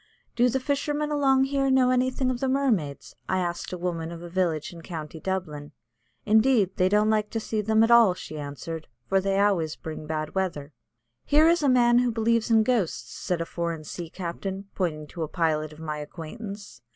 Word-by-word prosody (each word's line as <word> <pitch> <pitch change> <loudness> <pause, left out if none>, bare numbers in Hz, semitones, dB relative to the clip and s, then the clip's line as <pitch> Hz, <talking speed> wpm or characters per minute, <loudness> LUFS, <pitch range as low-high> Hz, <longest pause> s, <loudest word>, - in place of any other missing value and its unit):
"Do 245 +1 +4
the 265 +2 0
fishermen 295 +2 -1
along 270 -2 +3
here 275 0 +1
know 260 -1 +4
anything 255 +1 +1
of 245 - -3
the 265 - 0
mermaids?" 235 - 0
I 185 - +1
asked 175 -2 -3
a 180 - -4
woman 170 -2 -3
of 170 0 -8
a 175 - -9
village 175 -4 -1
in 170 - -10
County 160 -2 -7
Dublin. 155 -6 -4 0.5
"Indeed, 220 -2 +4
they 185 0 +3
don't 210 +2 +3
like 215 -1 +1
to 225 - -2
see 215 0 -2
them 220 +1 +3
at 225 - +3
all," 230 -6 +7
she 155 -4 -8
answered, 150 +3 -6 0.2
"for 195 0 +2
they 195 0 0
always 180 -6 +2
bring 155 -1 -7
bad 155 0 -3
weather." 160 -7 -3 0.5
"Here 305 +2 +5
is 340 0 +4
a 285 - +3
man 240 -1 +5
who 250 0 +2
believes 230 0 +1
in 225 -1 +5
ghosts," 190 - -1
said 180 +4 -2
a - - -1
foreign 170 -2 -4
sea 165 +2 -7
captain, 190 +3 -5
pointing 155 -5 -2
to 165 +3 -9
a 160 - -1
pilot 155 -2 0
of 150 - -13
my 155 -1 -4
acquaintance. 185 - -8
190 Hz, 200 wpm, -26 LUFS, 160-240 Hz, 0.5 s, all